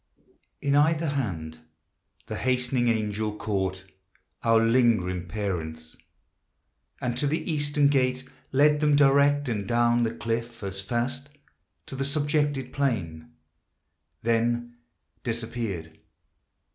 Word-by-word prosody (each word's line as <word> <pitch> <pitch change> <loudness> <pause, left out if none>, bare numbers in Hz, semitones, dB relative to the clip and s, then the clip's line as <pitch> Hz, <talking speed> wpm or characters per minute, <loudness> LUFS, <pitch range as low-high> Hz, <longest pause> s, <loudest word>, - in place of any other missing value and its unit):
In 140 -1 +1
either 155 +2 +3
hand 85 - -3 0.7
the - - -5
hastening 125 -1 +1
angel 110 -2 -1
caught 95 -3 -2 0.6
Our 115 -1 +4
lingering 110 -7 +2
parents, 80 -5 -4 1.0
and 120 -1 -2
to 145 - +2
the 160 +3 -1
eastern 145 -1 +2
gate 130 -2 +1 0.2
Led 150 +2 +4
them 150 -1 +3
direct, 145 0 +4
and 105 -5 -2
down 120 +1 +3
the 115 - +2
cliff 115 -1 -3
as 95 0 -4
fast 125 +6 -2 0.6
To - - -7
the 135 - -1
subjected 145 -2 0
plain; 85 - -2 0.9
then 120 +1 0 0.5
disappeared. 115 -9 -3
120 Hz, 105 wpm, -26 LUFS, 105-140 Hz, 1.0 s, Our